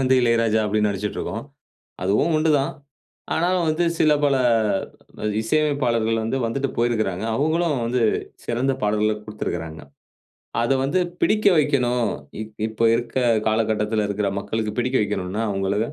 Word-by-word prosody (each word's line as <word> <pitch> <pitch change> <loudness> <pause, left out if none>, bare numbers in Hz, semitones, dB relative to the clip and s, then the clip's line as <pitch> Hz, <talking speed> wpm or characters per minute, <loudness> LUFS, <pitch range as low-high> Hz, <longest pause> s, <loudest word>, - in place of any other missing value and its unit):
வந்து 130 0 +3
இளையராஜா 115 -2 +2
அப்படின்னு 105 0 +1
நெனச்சுக்கிட்டு 100 +1 -3
இருக்கோம். 115 - -4 0.6
அதுவும் 105 - +2
உண்டுதான். 155 -1 +2 0.6
ஆனாலும் 175 +1 +1
வந்து 155 +3 +1
சில 155 -1 +4
பல 140 -1 +3 1.1
இசையமைப்பாளர்கள் 120 -4 +1
வந்து 115 +4 -1
வந்துட்டு 135 +4 -1
போயிருக்கறாங்க. 110 -5 0
அவங்களும் 160 +3 +1
வந்து 120 +1 0 0.4
சிறந்த 130 +3 0
பாடல்கள 105 +1 +1
குடுத்திருக்கறாங்க. 85 -7 -5 0.8
அதை 135 +3 +2
வந்து 155 +7 +1 0.2
பிடிக்க 215 0 +2
வைக்கணும். 125 -6 +2 0.3
இப் 110 0 -8
இப்ப 110 +1 -4
இருக்க 120 +2 -2 0.3
காலகட்டத்தில 110 -1 +1
இருக்கிற 100 0 -1
மக்களுக்கு 105 +2 -3
பிடிக்க 125 +2 +1
வைக்கணும்ன்னா, 105 +1 -2
அவங்களை 95 0 -1
115 Hz, 125 wpm, -22 LUFS, 105-135 Hz, 1.1 s, சில